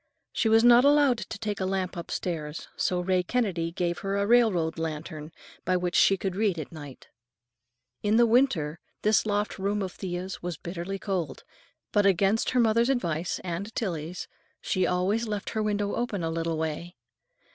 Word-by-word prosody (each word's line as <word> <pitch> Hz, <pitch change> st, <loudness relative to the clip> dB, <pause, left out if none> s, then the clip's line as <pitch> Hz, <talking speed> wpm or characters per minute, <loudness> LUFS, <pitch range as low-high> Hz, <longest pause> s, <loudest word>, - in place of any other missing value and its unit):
She 225 Hz, -, +1 dB
was 225 Hz, +1 st, +5 dB
not 240 Hz, +1 st, +7 dB
allowed 285 Hz, -4 st, +4 dB
to -, -, -6 dB
take 210 Hz, -2 st, -3 dB
a 190 Hz, -, -1 dB
lamp 190 Hz, -1 st, -2 dB
upstairs, 165 Hz, -2 st, -4 dB
so 180 Hz, -, 0 dB
Ray 185 Hz, 0 st, +2 dB
Kennedy 180 Hz, -5 st, -1 dB
gave 175 Hz, 0 st, -2 dB
her 195 Hz, 0 st, -2 dB
a 200 Hz, -, +1 dB
railroad 200 Hz, -9 st, +3 dB
lantern 155 Hz, -1 st, -5 dB, 0.3 s
by 185 Hz, 0 st, +1 dB
which 180 Hz, -1 st, -2 dB
she 195 Hz, -, +5 dB
could 190 Hz, -1 st, -3 dB
read 200 Hz, -3 st, +1 dB
at 155 Hz, -, -6 dB
night. 145 Hz, -5 st, -11 dB, 0.9 s
In 210 Hz, +1 st, +2 dB
winter 210 Hz, -, +2 dB, 0.2 s
this 215 Hz, 0 st, +3 dB
loft 205 Hz, 0 st, -1 dB
room 200 Hz, +1 st, 0 dB
of 185 Hz, -, -4 dB
Thea's 185 Hz, +1 st, -5 dB
was 175 Hz, -3 st, -4 dB
bitterly 175 Hz, +4 st, -5 dB
cold, 185 Hz, -8 st, -3 dB, 0.5 s
but 205 Hz, -1 st, +3 dB
against 195 Hz, +3 st, +2 dB
her 255 Hz, -, +1 dB
mother's 230 Hz, +1 st, +3 dB
advice—and 180 Hz, -2 st, -2 dB
Tillie's—she 180 Hz, 0 st, -3 dB
always 195 Hz, +6 st, 0 dB
left 210 Hz, -2 st, -3 dB
her 220 Hz, -, -1 dB
window 205 Hz, -1 st, -1 dB
open 225 Hz, -7 st, -2 dB
a 165 Hz, -, -1 dB
little 165 Hz, 0 st, -2 dB
way. 160 Hz, +3 st, -4 dB
190 Hz, 165 wpm, -27 LUFS, 170-215 Hz, 0.9 s, not